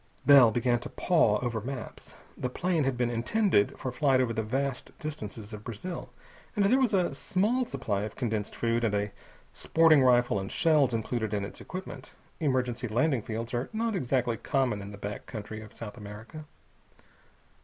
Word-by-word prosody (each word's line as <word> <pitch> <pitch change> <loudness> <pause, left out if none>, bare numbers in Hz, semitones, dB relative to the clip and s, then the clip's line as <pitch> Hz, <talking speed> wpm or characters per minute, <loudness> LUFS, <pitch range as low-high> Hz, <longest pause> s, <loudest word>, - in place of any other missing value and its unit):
Bell 140 -5 +8
began 120 +2 +1
to 120 - -8
paw 160 -12 +3
over 115 -3 -2
maps. 125 +1 -7 0.2
The 125 - -3
plane 170 +2 0
had 135 -2 0
been 120 -1 +1
intended 120 - +2
for 130 - -4
flight 135 0 +3
over 125 -3 +1
the 110 - -1
vast 135 +4 -3
distances 110 -9 -7
of 105 0 -8
Brazil, 125 - -6 0.5
and 205 -2 +3
there 255 +7 +4
was 260 -4 +3
a 180 -6 +1
small 215 - 0
supply 110 -7 -2
of 105 0 -5
condensed 110 -5 -2
food 115 0 0
and 105 -3 +1
a 105 0 -1 0.4
sporting 160 -3 +4
rifle 120 -4 +4
and 95 0 -5
shells 150 -7 +3
included 110 -1 -2
in 100 -1 -1
its - - -10
equipment. 185 0 -8 0.3
Emergency 125 -5 0
landing 125 +3 +1
fields 115 +1 -5
are 120 +2 -1
not 225 0 0
exactly 125 -7 0
common 125 -4 0
in 100 - -7
the 100 - -9
back 100 +1 -6
country 110 0 -6
of 110 - -11
South 115 +1 -8
America. 110 +9 -9
125 Hz, 175 wpm, -29 LUFS, 110-150 Hz, 0.5 s, Bell